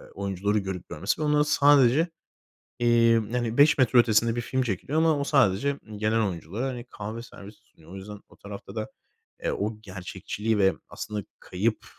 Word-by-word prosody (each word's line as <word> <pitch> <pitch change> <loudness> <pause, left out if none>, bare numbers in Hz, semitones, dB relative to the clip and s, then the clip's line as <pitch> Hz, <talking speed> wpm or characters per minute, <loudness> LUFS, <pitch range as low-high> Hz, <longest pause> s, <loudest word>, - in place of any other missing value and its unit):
oyuncuları 100 +1 -1
görüp 95 -2 -6
görmesi 90 - -2
ve - - 0
onlar 150 0 +3
sadece, 145 +1 +4 0.7
eee, 120 -1 +4 0.2
hani, 120 -2 -2
5 145 +1 +6
metre 125 -1 +4
ötesinde 115 0 +3
bir 120 - -1
film 130 +3 -1
çekiliyor 125 - -2
ama 160 -2 +3
o - - 0
sadece 140 0 +2
m 110 -1 -11
gelen 110 +2 +1
oyunculara, 95 - -4
hani, 125 -2 -6
kahve 110 +3 -6
servisi 105 -2 -13
sunuyor. 80 +2 -20
O - - -9
yüzden 100 +1 -9
o - - -20
tarafta 100 +2 -10
da, 110 -1 -4 0.5
eee, - - 0
o 105 +1 -3
gerçekçiliği 105 +3 -4
ve 95 0 +4 0.2
aslında 105 -2 -5 0.2
kayıp, 105 +5 -2
110 Hz, 175 wpm, -26 LUFS, 100-125 Hz, 0.7 s, 5